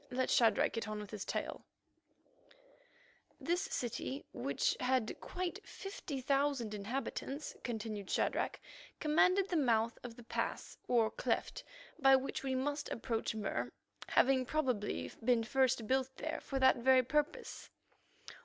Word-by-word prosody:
Let 255 +1 0
Shadrach 225 -3 +4
get 230 -1 -3
on 215 0 -3
with 210 -1 -8
his 210 -3 -4
tale." - - -3 1.8
This 350 +2 0
city, 265 - -3
which - - 0
had 255 -3 +1
quite 360 -1 -4
fifty 325 -9 -6
thousand 275 -4 +1
inhabitants, 265 +6 -4
continued 215 -4 -4
Shadrach, - - 0 0.4
commanded 365 +5 +3
the 350 - +1
mouth 230 -5 +2
of 240 -2 -7
the 240 - -12
pass - - -3
or 230 -3 +3
cleft - - -1 0.4
by 270 -2 +7
which 265 +1 -1
we 265 -1 -1
must 290 +3 -1
approach 225 -1 -2
Mur, 210 -2 -2 0.4
having 260 0 +4
probably 255 -7 -1
been 235 -1 +3
first 255 -1 +2
built 260 +2 +1
there 315 - -3
for 275 - -3
that 260 0 +5
very 260 +1 +5
purpose. 300 - -1
260 Hz, 135 wpm, -35 LUFS, 230-285 Hz, 1.8 s, by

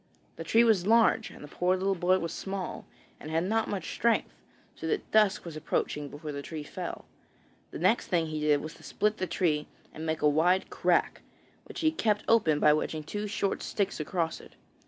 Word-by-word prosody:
The 165 - -6
tree 225 +8 +4
was 210 -5 +3
large, 230 0 +4
and - - -12
the - - -8
poor 180 +5 0
little 195 +1 +1
boy 185 0 +2
was 165 -2 -4
small, 195 -2 -5 0.3
and 155 - -8
had 165 +1 +1
not 220 +4 0
much 195 -4 -4
strength, 235 -1 +1 0.4
so - - -6
that 430 - -2
dusk 210 -4 +3
was 165 -2 -7
approaching 150 -1 -2
before 150 +2 -7
the 140 -1 -5
tree 155 +1 -6
fell. - - -6 0.6
The - - -7
next - - +2
thing 170 -2 +1
he 155 -1 -4
did 150 -1 +2
was 155 - -7
to - - -17
split 210 +1 0
the 185 - -2
tree 150 -6 0 0.3
and 160 - -7
make 160 -1 -2
a - - +6
wide 170 +6 +2
crack, - - +1 0.4
which - - -7
he 315 -1 +3
kept 215 -9 0
open 160 -10 +4
by 150 - +6
wedging 155 0 -2
two 205 +7 -4
short 200 -1 -1
sticks 200 -4 -2
across 165 +1 -2
it. - - -16
175 Hz, 205 wpm, -29 LUFS, 155-205 Hz, 0.6 s, a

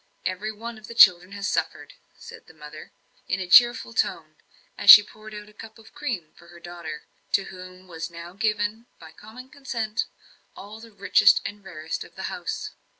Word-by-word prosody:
Every 190 +4 -3
one 225 +1 -9
of 215 - -14
the 235 - -10
children 180 -4 +6
has 200 0 -4
suffered," - - -3 0.2
said 465 -1 -14
the - - -18
mother, 150 0 -12 0.4
in 190 - -2
a 185 - -4
cheerful 240 +4 +5
tone, 165 -8 -2 0.4
as 200 - -1
she 210 - +12
poured 215 +1 -13
out 210 0 -10
a 210 - -18
cup 220 +1 -13
of 225 - -18
cream 235 - -5
for 170 - -19
her 175 0 -15
daughter, 170 -3 -9 0.3
to 200 - +2
whom 185 0 -12
was 165 -1 -7
now 170 +1 -11
given, 210 +3 -2
by - - -14
common 250 +5 -14
consent, 235 -7 -4 0.5
all 210 +2 -11
the 230 0 -14
richest 200 -1 +4
and 205 0 -7
rarest 160 -4 -6
of - - -18
the - - -8
house. - - -5
205 Hz, 190 wpm, -24 LUFS, 175-225 Hz, 0.5 s, she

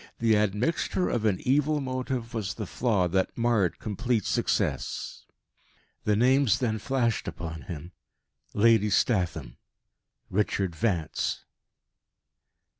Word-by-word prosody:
The 115 -2 +3
admixture 105 - 0
of 115 -2 -1
an 100 -4 +2
evil 150 +3 +2
motive 130 -2 -3
was 105 -2 -3
the 110 - -4
flaw 100 -3 +1
that 95 +2 0
marred 115 -7 +2
complete 115 0 -1
success. - - -1 0.8
The 105 - +3
names 130 +1 +4
then 110 -4 -1
flashed 120 -1 0
upon 80 -2 -6
him 85 0 -6 0.6
Lady 110 -1 +4
Statham 90 - 0 0.7
Richard 95 -3 0
Vance. 85 -6 -1
110 Hz, 110 wpm, -27 LUFS, 95-120 Hz, 0.8 s, names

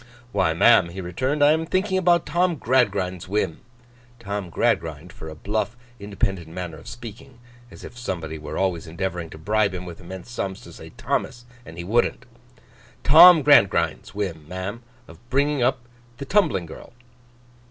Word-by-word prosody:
'Why, 95 -5 +1
ma'am,' 85 0 +5
he 90 +3 -8
returned, 130 +11 -1
'I 145 - +6
am 160 +1 +1
thinking 190 +2 0
about 175 -3 +3
Tom 175 0 +1
Gradgrind's 100 - 0
whim;' 95 -5 -1 0.6
Tom 100 -5 -5
Gradgrind, 80 +1 -1
for 80 - -9
a 80 - -9
bluff 105 +6 -3 0.2
independent 95 -4 -3
manner 85 -1 -7
of - - -15
speaking—as 120 +1 -13
if - - -10
somebody 85 -9 -5
were 75 - -7
always 90 -5 -1
endeavouring 85 0 -4
to - - -11
bribe 100 +3 0
him 90 0 -6
with 85 -2 -10
immense 95 +5 -10
sums 95 -5 -4
to - - -13
say - - -11
Thomas, 120 0 -3 0.2
and 80 - -11
he 85 - -5
wouldn't; 120 +5 0 0.8
'Tom 160 +2 +8
Gradgrind's 140 -11 +3
whim, 85 -7 -4
ma'am, 95 +6 -5 0.3
of - - -14
bringing 140 +1 +1
up 125 0 0 0.3
the 140 - -6
tumbling 185 - +1
girl. 80 - -12
100 Hz, 160 wpm, -23 LUFS, 90-130 Hz, 0.8 s, Tom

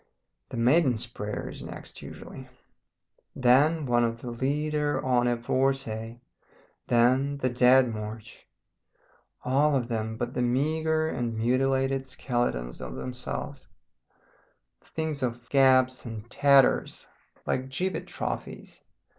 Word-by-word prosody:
The - - -6
'Maiden's 125 -1 +3
Prayer' 105 -3 -5
is - - -9
next - - -9
usually. - - -10 0.9
Then 140 +5 +4
one 120 -1 +2
of 115 0 -1
the 120 - -5
'Lieder 150 +4 -1
ohne 120 -2 +1
Worte,' 120 -4 -1 0.7
then 130 +4 +3
the 130 -2 0
'Dead 125 0 +5
March' 110 +1 -8 1.0
all 140 +3 +3
of 125 -3 -1
them 110 -1 -3
but 120 +1 -3
the - - -1
meagre 155 +5 +1
and 120 -5 -3
mutilated 135 +3 +1
skeletons 120 - -2
of - - -6
themselves; 125 - -6 1.2
things 160 -2 -4
of 120 -1 -3
gaps 130 -2 +4
and 115 -2 -7
tatters, 140 -2 +3 0.4
like 130 +1 -2
gibbet 185 +8 -3
trophies. - - -6
125 Hz, 115 wpm, -27 LUFS, 120-135 Hz, 1.2 s, Dead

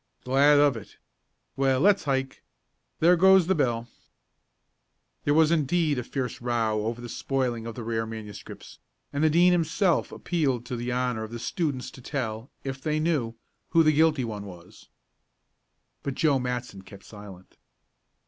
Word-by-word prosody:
"Glad 140 +3 +4
of 145 -1 +4
it. - - -11 0.6
Well, 135 -1 +2
let's 200 +3 +3
hike. 135 -1 -2 0.6
There 175 +3 +6
goes 190 0 +6
the 190 - +2
bell." 120 -7 0 1.4
There 145 - +3
was 160 0 +4
indeed 155 -2 +1
a - - -4
"fierce 125 -1 -4
row," 110 -3 0
over 115 +1 -3
the 120 - -7
spoiling 120 -2 -2
of 115 - -7
the 120 - -6
rare 115 0 -2
manuscripts, 105 -2 -9 0.3
and 140 +2 0
the 155 - +5
Dean 175 +3 +5
himself 175 +1 +1
appealed 140 -9 -1
to 125 - -4
the 120 +1 -3
honor 125 -2 -1
of 110 - -7
the 120 - -5
students 140 +1 -3
to 130 - -13
tell, 120 -3 -4
if 135 -1 -5
they 155 +2 -1
knew, 150 -8 -1 0.3
who 165 - +4
the 155 0 +4
guilty 155 -3 +3
one 105 -3 -6
was. 90 -2 -13 1.1
But 140 -2 -4
Joe 145 -4 +2
Matson 125 -5 -4
kept 100 0 -14
silent. 100 -3 -13
130 Hz, 160 wpm, -26 LUFS, 115-155 Hz, 1.4 s, There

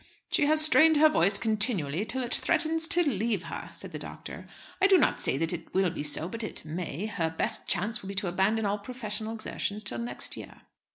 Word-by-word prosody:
"She 290 - +3
has 310 +1 +5
strained 315 0 +5
her 310 +1 +6
voice 200 - +4
continually 205 - +1
till 260 +4 -2
it 240 - -1
threatens 325 -1 +2
to 350 +1 +4
leave 220 -5 -1
her," - - -7
said - - -7
the - - -7
doctor; - - -10 0.3
"I 390 - +6
do 390 -1 +6
not - - +1
say 135 - +1
that 165 +3 0
it 170 0 -8
will 190 -2 +2
be 165 - -5
so, 150 +2 0
but 230 +5 -6
it 215 - -5
may. 170 +3 -5
Her 175 -7 -2
best 160 - -3
chance 205 +5 +1
will 190 - -10
be 195 - -5
to 185 0 0
abandon 195 +5 0
all 205 +1 -1
professional 220 -1 -4
exertions 215 -1 -4
till 205 - -2
next 235 +1 -1
year." - - -11
210 Hz, 220 wpm, -27 LUFS, 180-255 Hz, 0.3 s, her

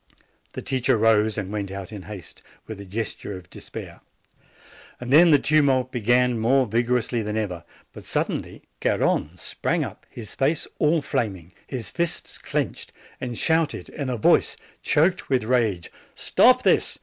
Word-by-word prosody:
The - - -6
teacher 130 -3 +1
rose 110 -1 +3
and 100 -2 -3
went 100 -2 -3
out 95 0 -7
in 105 -3 -7
haste, 100 -3 -10 0.2
with 110 -2 -8
a - - -9
ges 105 +3 -3
ture 100 - -7
of 90 -1 -15
despair. - - -9 1.0
Then 145 +8 +6
the 150 - +7
tumult 135 -4 +2
began 120 0 +2
more 130 +4 +3
vig 115 +2 0
orously 120 -1 0
than 105 +1 -3
ever. 90 -6 -3 0.3
But - - -11
suddenly - - -2 0.2
Garrone 80 +5 0
sprang - - -1
up, - - -9
his 110 -3 -8
face 145 +3 0
all 155 0 +3
flaming, 95 - -2 0.2
his 125 -5 -5
fists 170 -1 -3
clenched, - - -3 0.3
and 125 -3 -4
shouted 160 -2 0
in 140 -4 -4
a 125 - -1
voice 105 - +3 0.2
choked 170 +5 +2
with 130 -3 +2
rage: 110 -7 0 0.2
"Stop - - +4
this! - - +2
120 Hz, 160 wpm, -24 LUFS, 105-135 Hz, 1.0 s, the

